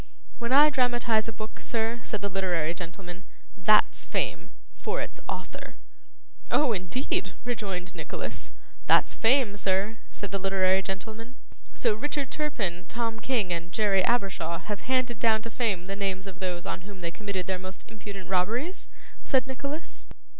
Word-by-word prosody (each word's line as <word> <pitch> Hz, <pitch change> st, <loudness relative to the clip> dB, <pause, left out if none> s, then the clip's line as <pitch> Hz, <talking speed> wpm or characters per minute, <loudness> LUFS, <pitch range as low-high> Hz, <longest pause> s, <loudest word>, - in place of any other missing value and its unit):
'When 235 Hz, 0 st, -2 dB
I 295 Hz, +3 st, +8 dB
dramatise 240 Hz, -4 st, +3 dB
a -, -, -2 dB
book, 215 Hz, 0 st, -7 dB
sir,' 230 Hz, 0 st, -1 dB
said 210 Hz, -3 st, -4 dB
the 200 Hz, -, 0 dB
literary 175 Hz, -4 st, +1 dB
gentleman, 180 Hz, +1 st, -7 dB, 0.3 s
'THAT'S 210 Hz, +2 st, +4 dB
fame. -, -, -1 dB, 0.3 s
For 450 Hz, +3 st, -1 dB
its -, -, -4 dB
author.' -, -, -5 dB, 0.7 s
'Oh, 295 Hz, -5 st, +4 dB
indeed!' 190 Hz, +1 st, -1 dB
rejoined 195 Hz, -7 st, -2 dB
Nicholas. -, -, -5 dB, 0.4 s
'That's -, -, +5 dB
fame, 230 Hz, -3 st, +4 dB
sir,' 200 Hz, +2 st, +1 dB
said 205 Hz, -, -5 dB
the 195 Hz, -, -1 dB
literary 190 Hz, 0 st, +3 dB
gentleman. 220 Hz, +5 st, -5 dB, 0.4 s
'So 230 Hz, -3 st, +3 dB
Richard 280 Hz, +4 st, -2 dB
Turpin, 205 Hz, -, -1 dB
Tom 225 Hz, -1 st, -2 dB
King, 220 Hz, -8 st, +1 dB
and 170 Hz, +1 st, -4 dB
Jerry 195 Hz, -2 st, +3 dB
Abershaw 190 Hz, -7 st, +1 dB
have 210 Hz, +6 st, -5 dB
handed 255 Hz, -3 st, +2 dB
down 220 Hz, -1 st, +4 dB
to 230 Hz, -, -5 dB
fame 205 Hz, -8 st, 0 dB
the 195 Hz, +1 st, -3 dB
names 195 Hz, -1 st, -1 dB
of 195 Hz, -1 st, -8 dB
those 180 Hz, -2 st, -2 dB
on -, -, -3 dB
whom 195 Hz, 0 st, -10 dB
they 170 Hz, -1 st, -2 dB
committed 195 Hz, -1 st, -3 dB
their 190 Hz, -1 st, -1 dB
most 185 Hz, 0 st, -8 dB
impudent 205 Hz, -4 st, -8 dB
robberies?' 225 Hz, -, 0 dB, 0.3 s
said 260 Hz, -3 st, +3 dB
Nicholas. 280 Hz, +4 st, -5 dB
205 Hz, 155 wpm, -28 LUFS, 185-240 Hz, 0.7 s, I